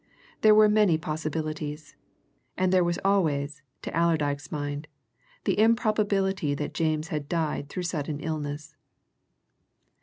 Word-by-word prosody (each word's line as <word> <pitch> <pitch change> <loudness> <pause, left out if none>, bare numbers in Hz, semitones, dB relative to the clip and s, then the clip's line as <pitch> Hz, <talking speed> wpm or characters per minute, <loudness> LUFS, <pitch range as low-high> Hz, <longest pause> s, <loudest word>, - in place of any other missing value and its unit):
There 215 -1 +7
were 215 0 +7
many 210 -6 +4
possibilities, 155 -1 -4 0.6
and 185 0 +2
there 185 -1 +5
was 170 0 0
always 155 -7 +1 0.2
to - - -5
Allerdyke's 150 -4 +1
mind 145 0 -4 0.6
the - - 0
improbability 205 -7 +2
that 145 +1 -4
James 155 -1 0
had 150 -3 -4
died 155 -4 -1
through 180 - -4
sudden 155 -4 -3
illness. 150 0 -4
155 Hz, 120 wpm, -27 LUFS, 150-185 Hz, 0.6 s, There